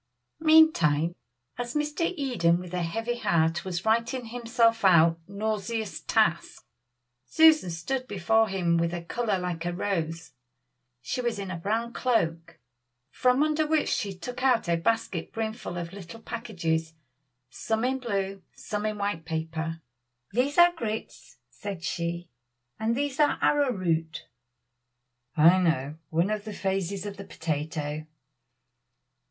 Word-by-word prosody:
Meantime, 310 Hz, -, +5 dB, 0.5 s
as 240 Hz, +2 st, -4 dB
Mr. 300 Hz, +3 st, 0 dB
Eden 220 Hz, -, +2 dB
with 180 Hz, -1 st, -9 dB
a 180 Hz, -, -1 dB
heavy 225 Hz, +8 st, -2 dB
heart 165 Hz, -2 st, +1 dB
was 185 Hz, 0 st, -4 dB
writing 235 Hz, +3 st, +1 dB
himself 230 Hz, -1 st, +1 dB
out 165 Hz, -3 st, +5 dB
nauseous 215 Hz, +1 st, -3 dB
task -, -, 0 dB, 0.6 s
Susan 315 Hz, -, +5 dB
stood 255 Hz, +10 st, -3 dB
before 220 Hz, +2 st, +2 dB
him 175 Hz, -3 st, +1 dB
with 170 Hz, +1 st, 0 dB
a 170 Hz, -, -5 dB
color 215 Hz, +3 st, -1 dB
like 180 Hz, -2 st, -3 dB
a 175 Hz, -, -1 dB
rose. 165 Hz, -3 st, -3 dB, 0.7 s
She 250 Hz, -, -2 dB
was 240 Hz, -3 st, -1 dB
in 195 Hz, -2 st, -5 dB
a 170 Hz, -, -4 dB
brown 225 Hz, +6 st, -1 dB
cloak, 165 Hz, -10 st, 0 dB, 0.5 s
from 255 Hz, +3 st, +3 dB
under 310 Hz, 0 st, +1 dB
which 310 Hz, 0 st, +1 dB
she 205 Hz, -4 st, -1 dB
took 245 Hz, +7 st, -7 dB
out 255 Hz, -7 st, +3 dB
a 170 Hz, -, +3 dB
basket 190 Hz, -1 st, -1 dB
brimful 220 Hz, -4 st, -4 dB
of 170 Hz, +1 st, -5 dB
little 200 Hz, +3 st, -9 dB
packages, 165 Hz, -10 st, -2 dB, 0.6 s
some 220 Hz, -, -1 dB
in 265 Hz, +1 st, 0 dB
blue, 195 Hz, -5 st, -2 dB
some 210 Hz, 0 st, -3 dB
in 215 Hz, -1 st, -3 dB
white 200 Hz, -5 st, -2 dB
paper. 160 Hz, 0 st, -4 dB, 0.5 s
"These 255 Hz, +6 st, 0 dB
are 345 Hz, 0 st, +7 dB
grits," 215 Hz, -, -6 dB
said 190 Hz, +5 st, -7 dB
she, 170 Hz, 0 st, -3 dB, 0.5 s
"and 225 Hz, +2 st, 0 dB
these 285 Hz, -1 st, -2 dB
are 295 Hz, -1 st, +4 dB
arrowroot." 185 Hz, -, +1 dB, 1.1 s
"I 170 Hz, +5 st, +7 dB
know 155 Hz, -4 st, 0 dB
one 170 Hz, +5 st, +1 dB
of 210 Hz, -1 st, -2 dB
the 215 Hz, -1 st, -6 dB
phases 195 Hz, 0 st, -2 dB
of 205 Hz, -1 st, -6 dB
the 200 Hz, -, -7 dB
potato." 155 Hz, -2 st, -4 dB
200 Hz, 135 wpm, -27 LUFS, 170-235 Hz, 1.1 s, are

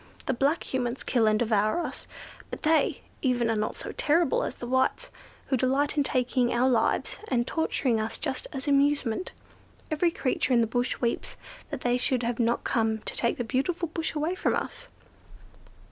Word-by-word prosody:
The -, -, +1 dB
black 280 Hz, +6 st, +1 dB
Humans 250 Hz, -1 st, -1 dB
kill 230 Hz, -3 st, +2 dB
and 215 Hz, 0 st, +4 dB
devour 215 Hz, +5 st, +2 dB
us; -, -, -6 dB, 0.4 s
but -, -, -7 dB
they, 315 Hz, 0 st, +2 dB, 0.2 s
even, 245 Hz, -3 st, +1 dB
are -, -, +1 dB
not 215 Hz, 0 st, -1 dB
so -, -, -5 dB
terrible 315 Hz, 0 st, +2 dB
as -, -, -3 dB
the -, -, -7 dB
Whites, 260 Hz, +2 st, 0 dB, 0.4 s
who 265 Hz, -, +2 dB
delight 270 Hz, +4 st, +1 dB
in 295 Hz, -, +3 dB
taking 255 Hz, -2 st, +1 dB
our 245 Hz, +2 st, +3 dB
lives, 235 Hz, -4 st, +1 dB
and 240 Hz, -2 st, +1 dB
torturing 260 Hz, -6 st, 0 dB
us 220 Hz, +1 st, -3 dB
just -, -, -3 dB
as 270 Hz, +2 st, -6 dB
an 285 Hz, -, +4 dB
amusement. 280 Hz, 0 st, +1 dB, 0.6 s
Every 310 Hz, +3 st, +2 dB
creature 260 Hz, -4 st, 0 dB
in 235 Hz, -, +5 dB
the -, -, +3 dB
bush 245 Hz, +3 st, -1 dB
weeps 235 Hz, -1 st, -2 dB, 0.3 s
that -, -, -5 dB
they 245 Hz, 0 st, +2 dB
should 250 Hz, -1 st, +1 dB
have 235 Hz, 0 st, -1 dB, 0.2 s
come 220 Hz, -1 st, +1 dB
to 215 Hz, -, -7 dB
take 235 Hz, -, 0 dB
the 245 Hz, -, -1 dB
beautiful 310 Hz, +8 st, -1 dB
bush 320 Hz, 0 st, -3 dB
away 305 Hz, +4 st, 0 dB
from 370 Hz, -, 0 dB
us." -, -, -4 dB
255 Hz, 185 wpm, -27 LUFS, 235-290 Hz, 0.6 s, in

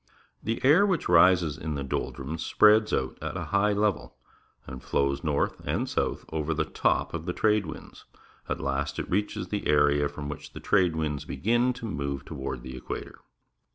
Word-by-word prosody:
The 115 Hz, +1 st, -2 dB
air 155 Hz, +9 st, +6 dB
which 190 Hz, -5 st, +1 dB
rises 85 Hz, -3 st, +4 dB
in 75 Hz, -1 st, -3 dB
the 70 Hz, -, -3 dB
doldnmis 70 Hz, +3 st, -4 dB
spreads 105 Hz, +5 st, +4 dB
out 65 Hz, -1 st, -1 dB
at 80 Hz, +3 st, -4 dB
a 85 Hz, -, -3 dB
high 100 Hz, +1 st, +3 dB
level 105 Hz, -2 st, -1 dB, 0.5 s
and 65 Hz, -1 st, -8 dB
flows 70 Hz, +2 st, 0 dB
north 75 Hz, -3 st, 0 dB
and -, -, -1 dB
south -, -, -2 dB
over 80 Hz, 0 st, -1 dB
the 80 Hz, 0 st, 0 dB
top -, -, 0 dB
of 85 Hz, 0 st, -5 dB
the 90 Hz, -, -1 dB
trade 105 Hz, -3 st, +2 dB
winds. 80 Hz, -, -10 dB, 0.4 s
At -, -, -2 dB
last 70 Hz, +1 st, -2 dB
it -, -, -3 dB
reaches 95 Hz, -1 st, -2 dB
the 105 Hz, -, -2 dB
area 75 Hz, -1 st, +3 dB
from 75 Hz, -1 st, -7 dB
which 75 Hz, -, -8 dB
the -, -, -8 dB
trade 90 Hz, -5 st, +2 dB
winds 75 Hz, -3 st, -2 dB
begin 120 Hz, +4 st, +1 dB
to 120 Hz, -1 st, -8 dB
move 70 Hz, -8 st, -3 dB
toward 65 Hz, -5 st, -5 dB
the 65 Hz, -, -7 dB
equator. 65 Hz, -, -7 dB
80 Hz, 185 wpm, -27 LUFS, 70-105 Hz, 0.5 s, air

